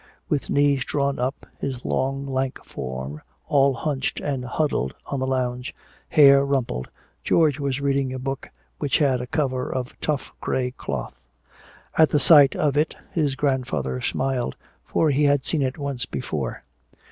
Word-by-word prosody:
With 145 - -1
knees 140 -2 +3
drawn 140 -1 -1
up, 130 +3 -2
his 130 -3 -4
long 135 +1 -1
lank 130 -1 -1
form 65 +3 -6 0.3
all 140 -2 +4
hunched 135 +1 -2
and 135 -3 -2
huddled 125 - -1
on 140 - -3
the 130 - -1
lounge, 125 -1 -2 0.3
hair 140 -2 +7
rumpled, 130 - -1 0.4
George 155 -4 +3
was 140 -1 -1
reading 140 -2 0
a 130 - -4
book 135 +1 -4 0.3
which 145 -3 +1
had 135 -4 +2
a 125 - -5
cover 130 -3 -1
of 130 -1 -3
tough 150 -3 -2
gray 125 -1 -1
cloth. - - -5 0.9
At 160 - +7
the 150 - +2
sight 145 -1 +7
of 145 -2 +1
it 155 +1 +1 0.2
his 150 -5 0
grandfather 125 - -1
smiled, 130 - -1 0.3
for 155 -2 +1
he 145 +2 +3
had 145 -2 +3
seen 160 - +1
it 130 +1 -1
once 140 -3 -3
before. 70 - -4
135 Hz, 160 wpm, -24 LUFS, 125-145 Hz, 0.9 s, hair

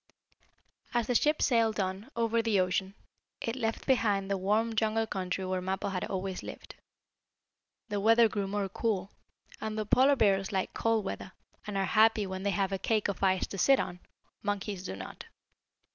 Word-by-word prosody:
As 240 -1 +2
the 245 - 0
ship 300 +5 +3
sailed 230 -4 +2
on, 190 +5 -3
over 230 0 +1
the 225 -4 +2
ocean, 185 +1 0 0.4
it 230 - -3
left 225 -3 -2
behind 205 -7 +2
the - - +2
warm, 215 +4 +1
jungle 220 0 +1
country 190 -2 -3
where 185 0 -1
Mappo 190 +2 -2
had 185 -2 -2
always 190 -1 -3
lived. - - -9 1.2
The 205 -1 -1
weather 225 +3 +6
grew 200 -2 -2
more 200 0 -1
cool, 200 -2 -2 0.5
and 220 0 -4
though 215 - -1
Polar 265 +6 +5
Bears 195 -5 +2
like 190 -2 -1
cold 225 -2 +1
weather, 190 - -5 0.3
and 205 -1 -3
are 195 - +1
happy 220 0 +4
when 190 0 -5
they 200 - 0
have 195 0 0
a 195 - -2
cake 215 -1 +1
of 200 - -4
ice 190 -1 +2
to 195 - -7
sit 270 +5 +5
on, 175 - -3 0.4
monkeys 205 -2 -3
do 95 - -5
not. 95 -1 -9
205 Hz, 180 wpm, -30 LUFS, 190-225 Hz, 1.2 s, weather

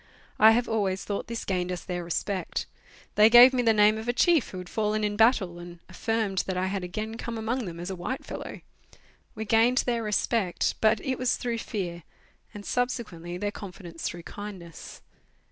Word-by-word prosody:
I 220 +1 +8
have 240 +1 +1
always 195 -4 -1
thought 200 - -3
this 230 -1 -5
gained 180 -1 -1
us 180 - -5
their 175 -1 -4
respect. 185 +3 -2 0.5
They 210 +1 +6
gave 245 +3 +9
me 250 - +2
the 230 -2 +4
name 215 0 +4
of 220 - -7
a 240 - +1
chief 325 +2 +3
who 185 - -8
had 180 -1 -7
fallen 215 +1 -1
in 205 0 0
battle, 210 -6 +3
and 175 0 -10
affirmed 210 0 -1
that 185 -1 -2
I 185 - 0
had 190 0 -2
again 215 +5 -5
come 235 -1 -5
among 230 +2 -2
them 170 -2 -7
as 175 +2 -5
a - - -4
white 185 +10 -5
fellow. - - -7 0.7
We 220 0 -4
gained 230 +4 +3
their 235 -2 0
respect, 210 -2 0
but 220 0 +4
it 260 -2 -2
was 255 -1 +1
through 235 -2 -3
fear, 175 -6 -4 0.5
and 205 -1 -10
subsequently 195 -9 -3
their 205 +2 -2
confidence 180 -5 -9
through 170 -1 -8
kindness. 185 -6 -9
210 Hz, 195 wpm, -27 LUFS, 180-230 Hz, 0.7 s, gave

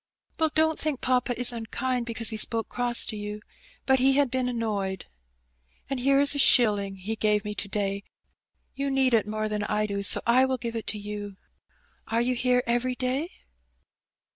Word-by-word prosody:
'* - - -66
" - - -39
Well 320 -1 +3
don't 315 0 +2
think 305 -4 -2
papa 250 -1 0
is 245 0 +3
unkind 240 +2 -3
because 230 -1 -1
he 220 - -4
spoke 225 +1 +2
cross 245 -1 -1
to 220 - -5
you, 210 0 -6 0.5
but 265 -1 +3
he 265 +2 +4
had 280 -2 +2
been 255 -1 0
annoyed. 205 -6 -3 0.9
And 270 - -1
here 275 +2 +3
is 285 0 +5
a 285 - 0
shilling 205 -7 +4
he 195 +4 -5
gave 210 -1 +1
me 210 - -3
to 200 - -3
day; 200 0 -2 0.7
you 275 +1 -2
need 265 -2 +2
it 220 -3 +3
more 215 0 -2
than 210 -1 -2
I 210 0 0
do, 200 -1 -3
so 200 - +3
I 245 +3 +4
will 260 0 -1
give 235 -1 -5
it 225 - -5
to 215 - -2
you. 205 -1 -7 0.7
Are 225 - 0
you 245 +2 +1
here 250 0 +1
every 240 +2 0
day 260 +6 -2
235 Hz, 200 wpm, -26 LUFS, 210-255 Hz, 0.9 s, is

